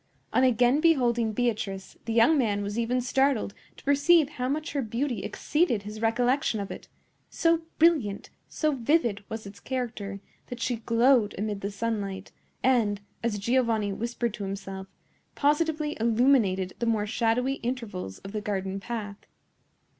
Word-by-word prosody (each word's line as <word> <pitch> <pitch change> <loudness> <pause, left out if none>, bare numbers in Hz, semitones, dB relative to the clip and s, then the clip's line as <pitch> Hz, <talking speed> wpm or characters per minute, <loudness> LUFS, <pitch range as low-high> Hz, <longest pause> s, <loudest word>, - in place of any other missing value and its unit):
On - - +4
again 250 +3 +4
beholding 240 -8 +3
Beatrice, 215 -4 -2
the 225 - -2
young 235 +8 +5
man 210 -7 +1
was 205 +3 -3
even 245 +2 +1
startled 255 -3 +1 0.2
to - - -15
perceive 285 +2 +4
how 255 -4 -3
much 305 +3 -2
her 285 - 0
beauty 240 +2 -2
exceeded 295 - 0
his 210 +1 -7
recollection 245 +1 +1
of 200 - -5
it; - - -8 0.4
so 330 0 +2 0.2
brilliant, 300 -12 +2 0.2
so 310 -1 0
vivid, 240 -6 +1
was 220 -1 -5
its 200 0 -10
character, 225 -6 -4 0.3
that 245 - -7
she 245 0 -1
glowed 230 0 +3
amid 205 0 -3
the 200 - -2
sunlight, 200 -2 -3 0.3
and, 230 -6 +3 0.2
as 230 -3 -1
Giovanni 225 -2 +1
whispered 235 +1 -2
to 210 - -6
himself, 195 -1 -5 0.5
positively 305 +1 +1
illuminated 225 -5 +3
the 235 - -1
more 220 -2 +1
shadowy 245 +4 0
intervals 225 - -4
of 195 - -10
the 215 0 -3
garden 195 -1 -2
path. 205 -1 -5
230 Hz, 150 wpm, -27 LUFS, 205-260 Hz, 0.5 s, young